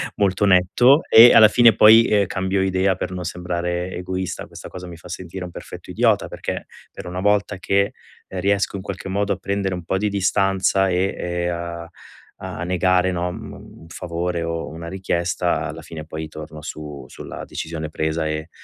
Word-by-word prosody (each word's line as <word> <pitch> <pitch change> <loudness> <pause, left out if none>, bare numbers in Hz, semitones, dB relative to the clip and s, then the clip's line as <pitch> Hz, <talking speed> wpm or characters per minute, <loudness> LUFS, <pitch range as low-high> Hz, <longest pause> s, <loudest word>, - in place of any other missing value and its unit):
molto 100 0 +1
netto 100 - +5
e 115 +2 +10
alla 110 - +9
fine 115 +1 +6
poi, 110 +2 +8
ehm, 105 -3 +3
cambio 95 0 -1
idea 95 0 +1
per - - -4
non 90 -1 -5
sembrare 90 +1 -3
egoista. 95 0 -4
Questa - - -10
cosa 90 0 -9
mi 85 -1 -9
fa 80 - -14
sentire 90 +1 -7
un 90 - -9
perfetto - - -10
idiota, - - +2
perché - - -5 0.3
per - - -10
una 90 +1 -4
volta 105 +1 +1
che, 100 +1 +1 0.3
ehm, 95 - -6
riesco 100 +1 +1
in 100 - -4
qualche 95 0 -6
modo 100 +1 -1
a 100 - 0
prendere 100 0 -2
un 90 -2 -6
po' 95 - 0
di 105 +2 0
distanza 95 -1 +2
e, 90 +2 0
ehm, 85 0 -2
a 85 0 -6 0.5
a 85 - -6
negare 90 0 +2
no 90 0 -2
mhmm, - - -8 0.3
un - - -14
favore 85 +1 -3
o 85 0 -3
una 85 +1 -8
richiesta, 85 -3 -1
alla 80 0 -7
fine 80 0 -8
poi 80 0 -6
torno 75 0 -9
su 75 -2 -8
sulla - - -9
decisione 80 -1 -5
presa 80 +1 -1
e 75 +1 -4
90 Hz, 185 wpm, -21 LUFS, 85-95 Hz, 0.5 s, e